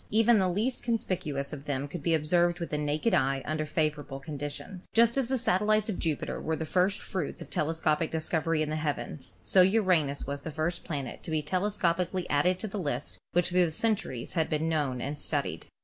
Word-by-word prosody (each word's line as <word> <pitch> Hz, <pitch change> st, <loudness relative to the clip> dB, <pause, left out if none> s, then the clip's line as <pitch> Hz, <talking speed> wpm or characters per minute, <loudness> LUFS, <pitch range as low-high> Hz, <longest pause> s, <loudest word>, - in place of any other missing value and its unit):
Even 225 Hz, +1 st, +5 dB
the 185 Hz, -1 st, +2 dB
least 220 Hz, +8 st, -1 dB
conspicuous 165 Hz, -, -2 dB
of 145 Hz, -1 st, -7 dB
them 140 Hz, -1 st, -2 dB
could 175 Hz, +5 st, -6 dB
be 165 Hz, -1 st, +2 dB
observed 175 Hz, +3 st, +2 dB
with 170 Hz, -, -4 dB
the 150 Hz, -, 0 dB
naked 150 Hz, +8 st, 0 dB
eye 135 Hz, -4 st, +2 dB
under 155 Hz, 0 st, -2 dB
favorable 150 Hz, -2 st, -1 dB
conditions. 145 Hz, +5 st, -6 dB
Just 235 Hz, 0 st, +5 dB
as 270 Hz, -3 st, +1 dB
the 265 Hz, +1 st, +1 dB
satellites 215 Hz, 0 st, +2 dB
of 185 Hz, -, -5 dB
Jupiter 160 Hz, -4 st, -2 dB
were 160 Hz, -, -1 dB
the 160 Hz, -, -3 dB
first 185 Hz, +5 st, +2 dB
fruits 185 Hz, -7 st, -4 dB
of -, -, -9 dB
telescopic 155 Hz, 0 st, +1 dB
discovery 160 Hz, 0 st, 0 dB
in 155 Hz, -, -3 dB
the -, -, 0 dB
heavens, 150 Hz, -1 st, -3 dB
so 190 Hz, -, +6 dB
Uranus 180 Hz, -8 st, +3 dB
was 140 Hz, 0 st, -4 dB
the 160 Hz, -, -5 dB
first 160 Hz, +3 st, -2 dB
planet 140 Hz, -6 st, -4 dB
to -, -, -6 dB
be 155 Hz, -1 st, 0 dB
telescopically 180 Hz, 0 st, 0 dB
added 180 Hz, +6 st, +3 dB
to 215 Hz, -, -4 dB
the 205 Hz, 0 st, -4 dB
list 95 Hz, -, -3 dB
which 175 Hz, 0 st, +3 dB
through 180 Hz, -1 st, +3 dB
centuries 160 Hz, -, -1 dB
had 160 Hz, -3 st, +1 dB
been 155 Hz, +1 st, 0 dB
known 145 Hz, -6 st, 0 dB
and 145 Hz, +3 st, -4 dB
studied. 140 Hz, -, -2 dB
160 Hz, 200 wpm, -29 LUFS, 145-185 Hz, -, so